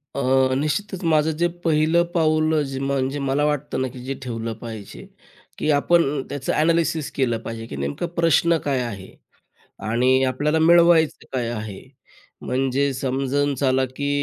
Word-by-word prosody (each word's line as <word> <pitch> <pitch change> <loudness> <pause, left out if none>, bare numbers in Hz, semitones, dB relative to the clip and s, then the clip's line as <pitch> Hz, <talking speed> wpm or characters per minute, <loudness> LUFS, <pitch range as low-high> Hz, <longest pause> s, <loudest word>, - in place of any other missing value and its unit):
अ, 140 - -1 0.3
निश्चितच 180 +7 -2
माझं 155 0 +3
जे 175 - +2 0.2
पहिलं 160 +2 +3
पाऊल 155 -1 +2
अ, 150 - +2 0.2
म्हणजे 135 0 -1
मला 140 +2 0
वाटतं 150 -2 -1
ना 130 - 0
की 125 0 -10
जे 135 - -2
ठेवलं 115 -2 -4
पाहिजे 110 -4 -8 0.5
की - - -2
आपण 145 -1 +2
त्याचं 140 -2 -3
ॲनालिसिस 160 -1 +1
केलं 120 -4 0
पाहिजे 115 -1 -6
की - - -7
नेमका 70 - -3
प्रश्न 165 +1 +3
काय 135 -2 +1
आहे? 100 -6 -7 0.8
आणि 130 +3 +3
आपल्याला 145 +5 0
मिळवायचं 170 -1 +4
काय 125 -3 -1
आहे? 105 -4 -6 0.6
म्हणजे 135 +2 0
समजून 135 +2 -1
चला 130 0 +1
की 145 0 -2
140 Hz, 150 wpm, -22 LUFS, 130-155 Hz, 0.8 s, मिळवायचं